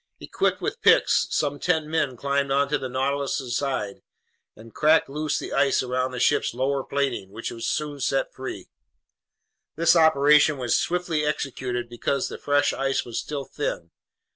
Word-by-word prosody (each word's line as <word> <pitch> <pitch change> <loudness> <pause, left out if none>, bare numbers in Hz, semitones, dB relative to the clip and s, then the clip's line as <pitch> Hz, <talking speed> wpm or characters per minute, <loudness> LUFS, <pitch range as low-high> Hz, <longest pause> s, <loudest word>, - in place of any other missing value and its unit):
Equipped - - -1
with - - -3
picks, - - +4
some 145 -1 -1
ten 160 -4 0
men 155 -5 -1
climbed 140 +1 0
onto 140 +1 +1
the 130 - -5
Nautilus's 135 -1 -2
sides 120 -8 -2 0.6
and 115 +1 -14
cracked 155 +1 +3
loose 150 +1 -2
the - - -5
ice 140 -2 +2
around 130 0 -1
the 125 -1 -6
ship's 120 - +1
lower 135 +2 0
plating, 135 -9 -2
which 115 +4 -6
was 115 0 -5
soon 150 -2 -2
set 135 +1 -1
free. 130 -8 -7 1.1
This 165 +2 +4
operation 150 -2 +5
was 125 -2 0
swiftly 175 -3 0
executed 130 -5 -3
because 120 +3 -2
the - - -8
fresh 145 0 +2
ice 135 0 -1
was 120 - -4
still 145 -2 -5
thin. 85 - -4
140 Hz, 160 wpm, -24 LUFS, 125-150 Hz, 1.1 s, operation